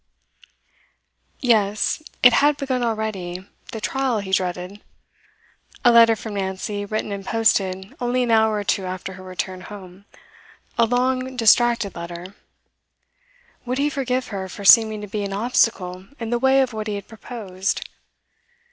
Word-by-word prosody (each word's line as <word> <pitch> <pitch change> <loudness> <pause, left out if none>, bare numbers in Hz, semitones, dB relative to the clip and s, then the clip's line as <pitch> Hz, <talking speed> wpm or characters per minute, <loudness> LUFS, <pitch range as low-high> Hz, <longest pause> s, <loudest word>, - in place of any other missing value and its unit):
Yes, 215 +1 +2 0.2
it 245 -1 +8
had 290 0 +4
begun 265 -3 -2
already, 210 -6 -3 0.3
the 225 - -5
trial 265 +1 -1
he 200 -2 -5
dreaded. 180 +2 -2 1.0
A 240 - +8
letter 230 -1 +7
from 220 0 -7
Nancy, 200 +1 -3
written 215 0 -3
and 200 -1 -5
posted 195 -3 0
only 250 +1 +1
an 240 - -1
hour 220 -1 +4
or 205 - -2
two 195 -1 -1
after 185 +1 -5
her 185 - -11
return 185 0 -5
home 190 0 -11 0.7
a 230 -1 +3
long, 255 +2 0
distracted 230 -2 +4
letter. 175 +2 -8 1.3
Would 250 +1 -3
he 290 +2 +1
forgive 255 -2 -2
her 190 -2 -5
for 200 +2 -8
seeming 220 0 +6
to 210 - -7
be 205 +1 -3
an 200 -1 -4
obstacle 195 -4 0
in 230 -1 -4
the 240 - +1
way 265 +1 +4
of 255 -3 -4
what 215 0 -4
he 210 - -2
had 200 -1 -7
proposed? 205 -4 -4
215 Hz, 150 wpm, -22 LUFS, 190-240 Hz, 1.3 s, it